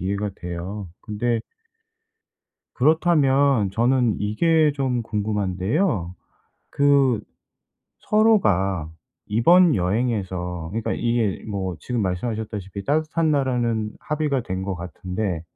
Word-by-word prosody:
이해가 100 +3 -2
돼요. 90 +3 -6
근데 115 +2 -1 1.3
그렇다면 140 - +3
저는 120 +2 +2
이게 155 +9 +2
좀 130 -3 -1
궁금한데요. 105 - -1 0.6
그 140 -5 +3 0.8
서로가 100 - +2 0.4
이번 170 - +5
여행에서 90 -4 -1
그러니까 110 +3 -2
이게 115 -4 -1
뭐 95 -4 -3
지금 125 -2 -2
말씀하셨다시피 100 0 -3
따뜻한 155 +2 +1
나라는 120 -6 0
합의가 150 -4 -1
된 95 -3 -4
것 95 -1 -3
같은데 90 +1 -4
110 Hz, 235 characters per minute, -23 LUFS, 95-135 Hz, 1.3 s, 이번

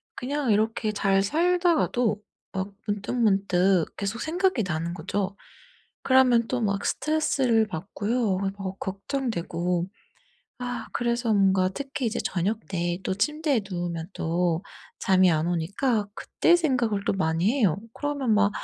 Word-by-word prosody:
그냥 275 0 -1
이렇게 215 +1 +1
잘 195 -1 +2
살다가도 315 - +2 0.3
막 190 0 -3 0.2
문득문득 195 -4 +1
계속 200 +3 -3
생각이 350 - +1
나는 165 -1 -2
거죠. 195 +3 -3 0.7
그러면 255 -3 +4
또 255 -1 -1
막 200 -2 -1
스트레스를 270 -7 +1
받고요. 205 +3 -1
막 195 0 -2
벅 195 -1 -5
걱정되고 180 -5 -2 0.7
아 245 -2 -4
그래서 235 -1 0
뭔가 190 -2 +3
특히 275 +5 -4
이제 220 - -1
저녁때 175 -2 -2
또 - - 0
침대에 300 - 0
누우면 175 -1 -4
또 170 +1 0 0.4
잠이 185 -1 +4
안 160 +1 0
오니까 205 - 0
그때 345 - +2
생각을 245 -11 0
또 - - +3
많이 170 +3 +1
해요. 205 - +2 0.2
그러면 285 -6 0
막 205 -1 +4
205 Hz, 270 characters per minute, -26 LUFS, 185-250 Hz, 0.7 s, 그러면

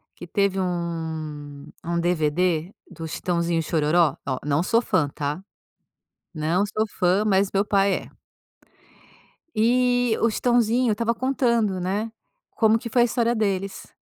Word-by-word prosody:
que - - -9
teve 195 +2 0
um 160 -5 -4 0.2
um 170 0 -1
DVD 170 +1 0 0.2
do 165 -1 -7
Chitãozinho 170 0 -1
e - - +1
Xororó, 155 0 +2
Ó, 130 -2 -1
não 145 +2 +1
sou 230 +5 +2
fã, 165 -11 +1
tá? 145 +5 -4 0.9
Não 165 +4 0
sou 215 +1 -1
fã, 185 +3 +3
mas 195 -1 +2
meu 200 +1 +2
pai 200 -1 +2
é. - - -6 1.4
E 245 +1 +2
o 230 - +4
Chitãozinho 240 +1 +2
estava 230 +2 0
contando, 235 -7 +1
né, 205 +5 -2 0.4
como 220 -1 +3
que 235 +1 -7
foi 240 +1 +4
a - - +4
história 235 0 +1
deles. 195 -3 -2
190 Hz, 140 wpm, -24 LUFS, 165-225 Hz, 1.4 s, o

